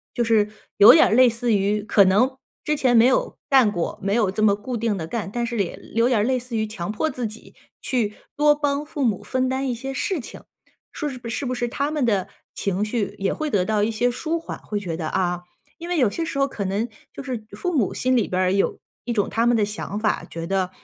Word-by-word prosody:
就 240 - +1
是 220 -2 +3 0.3
有 205 - +10
点 320 - +6
儿 - - 0
类 255 +2 +7
似 230 -1 +1
于 205 +2 +1
可 205 -1 +4
能 250 +8 +3 0.3
之 300 - 0
前 255 -4 +3
没 230 - +7
有 - - +1
干 260 -6 +5
过， 175 -4 -3
没 195 +1 -1
有 215 -4 +2
这 215 +3 -1
么 200 -2 +5
固 240 +4 -5
定 225 -2 0
地 165 -4 -5
干， 205 +1 -4
但 240 +1 -2
是 235 0 -3
也 195 -5 -1 0.2
有 230 +1 +4
点 245 -4 +2
儿 205 - +2
类 255 +2 +1
似 245 -1 -5
于 220 0 0
强 210 -2 -5
迫 315 +9 -1
自 250 -5 -4
己 215 0 -9 0.3
去 230 -6 -1 0.2
多 295 0 +5
帮 290 0 -1
父 295 -2 -4
母 215 -6 0
分 255 0 -1
担 265 +1 -1
一 250 - 0
些 265 +3 -5
事 340 +6 -2
情， 245 - -10 0.5
说 300 - -3
是 255 - -7 0.3
不 255 - -2
是 240 0 -1
他 280 +4 -2
们 300 -4 0
的 200 -5 +1 0.3
情 200 +1 -1
绪 215 -1 -2
也 195 0 0
会 310 -1 -3
得 190 -6 +1
到 210 +1 +1
一 215 - +2
些 240 +2 +1
舒 320 +6 -2
缓， 330 - -7
会 210 -1 -4
觉 175 -5 -4
得 160 -1 -4
啊。 175 0 -1 0.4
因 340 - -7
为 355 - 0
有 255 - +4
些 335 - -3
时 300 - -4
候 275 0 +3
可 215 - -5
能 200 +5 -1 0.2
就 275 - -8
是 250 -5 -4
父 360 -2 -2
母 230 -9 +2
心 255 0 +1
里 235 - +2
边 185 - -1
儿 185 0 +2
有 200 - +1 0.3
一 240 - -2
种 205 -4 +1
他 230 +1 +1
们 240 - +4
的 210 - +2
想 205 0 -5
法， 215 -1 0
觉 165 0 -6
得， 190 0 0
230 Hz, 275 characters per minute, -23 LUFS, 205-260 Hz, 0.5 s, 有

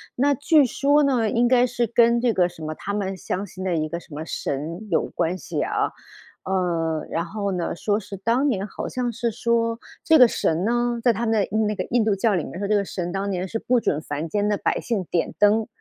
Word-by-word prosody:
那 280 +3 +3
据 290 +1 +4
说 285 +4 +2
呢， 245 -6 +2
应 240 +3 +2
该 250 0 +4
是 240 0 0
跟 235 +1 +3
这 240 -3 +2
个 180 -1 +3
什 165 -2 -11
么 155 0 -3
他 200 - -5
们 195 -2 -2
相 190 +3 -3
信 185 0 -9
的 185 -2 0
一 155 -1 -1
个 170 +1 -4
什 160 - -15
么 150 +2 -5
神 165 +9 -4
有 - - +2
关 175 +2 -2
系 - - -4
啊。 - - 0 0.5
呃， 170 -4 -1
然 165 +1 -2
后 200 +2 -3
呢， 175 -2 -2
说 205 +4 0
是 200 -1 -8
当 235 +8 +1
年 205 -6 -1
好 - - -6
像 245 -1 -2
是 235 +1 -2
说 230 0 0 0.2
这 320 -1 +5
个 250 - +9
神 165 -5 0
呢， 240 +1 0
在 240 - +5
他 230 +2 -2
们 225 - 0
的 - - -1 0.2
那 210 - 0
个 185 - -2
印 235 -2 +1
度 205 -3 +2
教 205 0 +2
里 170 - 0
面 180 - -7
说， 200 - -2
这 210 - +2
个 200 -1 +1
神 175 -2 -4
当 195 +1 -2
年 185 0 -2
是 225 - -3
不 245 +1 +1
准 150 -8 0
凡 155 +1 -5
间 205 +4 0
的 210 - +2
百 - - -1
姓 220 -6 -2
点 170 - -1
灯。 210 +2 +4
205 Hz, 260 characters per minute, -23 LUFS, 180-235 Hz, 0.5 s, 个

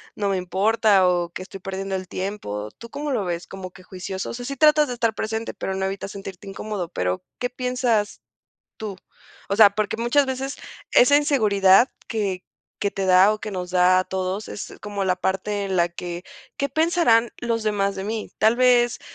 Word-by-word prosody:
no 205 -1 -1
me 195 - +1
importa, 200 +2 +3
o 175 -1 +1
que - - -6
estoy 195 +1 -9
perdiendo 195 +1 -4
el 185 -1 -5
tiempo. 175 - -4
¿Tú 235 - -11
cómo 290 +4 -4
lo 225 -7 0
ves? 175 -1 -3
¿Como 190 -1 -8
que 185 0 -16
juicioso? 190 +1 -6
O - - -5
sea, 245 +1 -6
sí 275 - -4
tratas 300 +1 +5
de 250 - -3
estar 230 -2 0
presente, 220 +1 -3
pero 190 - -4
no 190 0 -1
evitas 195 +1 -4
sentirte 195 -1 -9
incómodo. 195 -2 -4
Pero, 90 - -2 0.2
¿qué 245 - -1
piensas 250 -4 -1 0.6
tú? 210 -3 -5 0.5
O 200 - +1
sea, 215 -1 +9
porque 210 0 -2
muchas 240 +5 +3
veces 265 +1 -4 0.4
esa 270 +4 +6
inseguridad 215 - +4 0.2
que 200 -5 -2 0.4
que 200 - 0
te 195 -1 -2
da, 185 +3 +6
o 215 - -5
que 215 - -5
nos 180 -2 -5
da 180 0 +5
a 185 - +1
todos, 190 +2 -3
es - - -7
como 205 -1 -3
la 185 -1 +1
parte 195 +2 -1
en 195 -1 -2
la 170 -1 +3
que, 175 0 -6 0.3
¿qué 280 - -1
pensarán 310 -7 +3
los 230 -2 -2
demás 200 -2 0
de 190 - -4
mí? 220 +1 -4
Tal 220 +2 +4
vez 245 -1 +3
200 Hz, 200 wpm, -23 LUFS, 190-235 Hz, 0.6 s, sea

